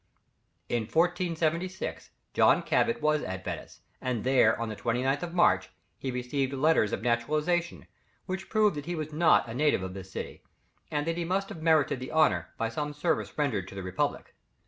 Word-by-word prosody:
In 115 0 -1
1476, 175 - -1 0.2
John - - +4
Cabot 230 -9 +1
was 155 0 +3
at 95 0 -5
Venice, - - -6 0.2
and 125 -4 -2
there 125 -4 +4
on 115 - -2
the 110 - -5
29th 130 +6 0
of 175 0 -5
March, 175 - +3 0.3
he 135 - -3
received 130 +2 -2
letters 135 -6 +3
of - - -3
naturalization, 150 +9 0 0.4
which 190 +1 -5
prove 215 -2 +3
that 145 +1 -6
he 175 - -2
was 155 -1 -5
not 160 -3 +4
a 115 - -6
native 145 -6 +2
of 95 0 -5
this 95 -1 -9
city, - - -6 0.5
and 150 -1 -1
that 165 0 -1
he 175 - -1
must 190 +3 -1
have 160 - -8
merited 155 -5 +3
the 130 - -6
honour 105 - +3
by 115 - 0
some 150 +6 -3
service 160 +2 -1
rendered 115 -11 0
to - - -10
the 95 - -5
Republic. 95 0 -2
150 Hz, 185 wpm, -29 LUFS, 120-165 Hz, 0.5 s, John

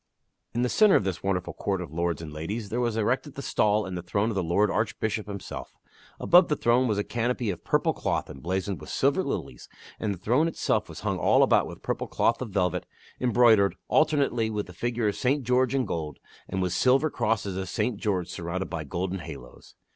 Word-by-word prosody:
In 120 - +1
the - - +2
centre 210 - +5
of - - +4
this 95 -2 -3
wonderful 95 -2 -1
court 95 -2 -2
of 85 -5 -6
lords 85 -1 -1
and 75 -2 -8
ladies 100 +8 -4
there 120 - -2
was 120 -2 0
erected 125 +6 0
the 140 - -6
stall 105 -3 +2
and 95 - -5
the 90 - -3
throne 100 +5 0
of 110 - -3
the 95 - +1
lord 90 +5 +2
Archbishop 110 -1 -1
himself. 100 -2 -7 0.4
Above 175 0 +6
the 150 - +1
throne 125 0 +3
was 105 -3 0
a 105 - +1
canopy 120 -1 -1
of 90 - -8
purple - - +1
cloth - - -2
emblazoned 95 +4 -3
with - - -10
silver - - +2
lilies, - - -5 0.3
and 110 - -1
the 100 - -4
throne 125 - +2
itself 165 - -1
was - - -9
hung - - -1
all - - +4
about - - +3
with - - -10
purple - - -2
cloth 115 - +1
of 125 - -4
velvet, 95 -3 0 0.3
embroid 120 -3 +5
ered, 100 0 +2 0.2
alternately, 140 -7 +2
with 105 -2 -2
the 90 - -12
figure 120 +3 -1
of 105 - 0
St. 135 +2 +1
George 125 +1 +2
in 130 -2 +1
gold, 80 -7 -4 0.3
and 95 0 -1
with 90 -1 -1
silver 135 - +3
crosses 105 -4 -1
of 95 -1 -4
St. 110 +2 -1
George 95 -5 -1
surrounded 90 +1 -4
by 80 -3 -3
golden 90 +6 -3
halos. 75 -7 -11
105 Hz, 215 wpm, -27 LUFS, 90-120 Hz, 0.4 s, Above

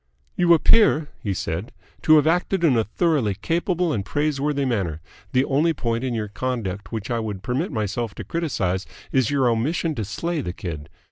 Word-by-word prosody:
"You 170 -1 +5
appear," 160 -4 +4
he 100 - -2
said, 90 +2 -3 0.3
"to 155 - +6
have 150 -1 +5
acted 175 +2 +1
in 150 -7 +5
a 115 - +3
thoroughly 135 - +1
capable 170 - 0
and 100 - -1
praiseworthy 145 +2 0
manner. 95 -11 -1 0.3
The 130 +1 +3
only 155 +4 +2
point 115 -1 -1
in 125 -2 -1
your 110 -2 -2
conduct 105 -5 -4
which 110 0 -4
I 120 - +1
would 105 -4 -4
permit 135 +9 -1
myself 110 -1 -2
to - - -6
criticise 100 - -1 0.2
is 130 -4 +2
your 135 -3 +2
omission 150 +8 0
to 115 - -3
slay 160 - -2
the 90 -8 -4
kid. 80 -6 -6
125 Hz, 185 wpm, -23 LUFS, 105-155 Hz, 0.3 s, to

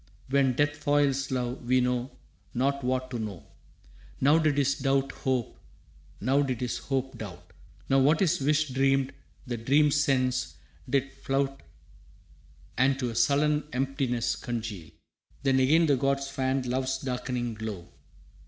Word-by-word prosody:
When 135 -2 +3
death 145 +2 +1
foils 145 -2 +1
love 125 -1 -2
we 130 +1 +3
know 125 0 0 0.5
not 140 +2 0
what 130 0 -1
to 120 - -3
know. 105 -6 -5 0.8
Now 145 +4 +5
did 155 -3 +1
his 140 -1 +3
doubt 135 -1 0
hope, 130 -4 -2 0.6
now 135 +6 +2
did 130 -4 -1
his 125 -1 -2
hope 135 -1 -3
doubt. 95 -5 -9 0.3
Now 135 - +4
what 145 +4 +4
his 175 -3 +2
wish 150 +2 +2
dreamed 135 0 +1 0.3
the 120 -2 -3
dream's 145 +5 +3
sense 130 -2 0 0.3
did 135 0 +1
flout 135 0 -2 1.2
And 135 +1 +3
to 125 -3 -2
a - - -8
sullen 150 +5 +2
emptiness 130 -2 0
congeal. 110 -8 -5 0.5
Then 135 -1 +3
again 155 +6 +4
the 145 -3 +3
gods 140 +1 0
fanned 130 -1 -1
love's 130 +1 -1
darkening 125 -2 -3
glow. 105 -5 -6
135 Hz, 145 wpm, -28 LUFS, 125-140 Hz, 1.2 s, Now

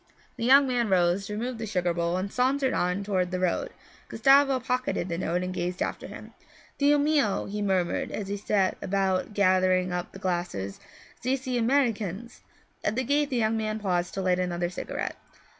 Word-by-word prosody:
The 230 - -3
young 275 +2 +6
man 240 -3 0
rose, 185 +1 +2
removed 230 +3 -3
the 225 - -4
sugar 180 -4 0
bowl, 170 +1 -1
and 195 +2 -4
sauntered 265 +1 +1
on 180 +3 0
toward 185 -3 0
the 185 0 -2
road. 185 - 0 0.4
Gustavo 270 +3 +4
pocketed 255 -6 -2
the 170 - -2
notes 175 0 -1
and 180 0 -3
gazed 180 0 -3
after - - -3
him. - - -11 0.5
'Dio 290 +1 +4
mio,' 290 -8 +1
he 210 +1 -4
murmured 190 -4 0
as 205 - -4
he 200 - -2
set 200 -2 0
about 195 +1 0
gathering 185 -2 +3
up 180 0 -3
the - - -10
glasses, 175 - -3 0.4
'zese 260 0 -1
Americans!' 235 -4 0 0.4
At 210 - 0
the 260 - 0
gate 285 +3 +1
the 255 - -1
young 220 -1 +1
man 215 -1 -2
paused 180 -4 -1
to 195 - -2
light 185 -1 +2
another 175 -1 -1
cigarette. - - -4
200 Hz, 180 wpm, -27 LUFS, 180-250 Hz, 0.5 s, young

